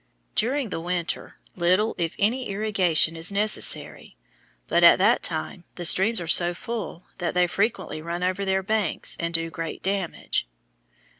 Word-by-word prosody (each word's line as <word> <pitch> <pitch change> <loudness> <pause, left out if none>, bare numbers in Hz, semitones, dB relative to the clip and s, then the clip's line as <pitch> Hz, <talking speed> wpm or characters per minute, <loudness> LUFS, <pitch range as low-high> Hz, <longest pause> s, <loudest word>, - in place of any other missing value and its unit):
During 255 +2 0
the 165 - -4
winter 175 0 -3 0.2
little 185 +5 +2
if 165 -1 -2
any 245 +5 0
irrigation 190 -6 +1
is 165 +3 -1
necessary, 205 - -1 0.5
but - - +2
at - - +8
that - - +3
time 80 - -3
the 175 - -5
streams 200 +6 +3
are 175 - -5
so 175 +1 +4
full 210 -6 -6
that 175 -1 -2
they 180 0 +4
frequently 195 -3 -2
run 170 +2 -4
over 185 +2 -1
their 190 0 0
banks 210 -4 0
and 170 0 -2
do 165 0 -2
great 165 -1 -6
damage. 190 - -2
180 Hz, 155 wpm, -24 LUFS, 170-205 Hz, 0.5 s, at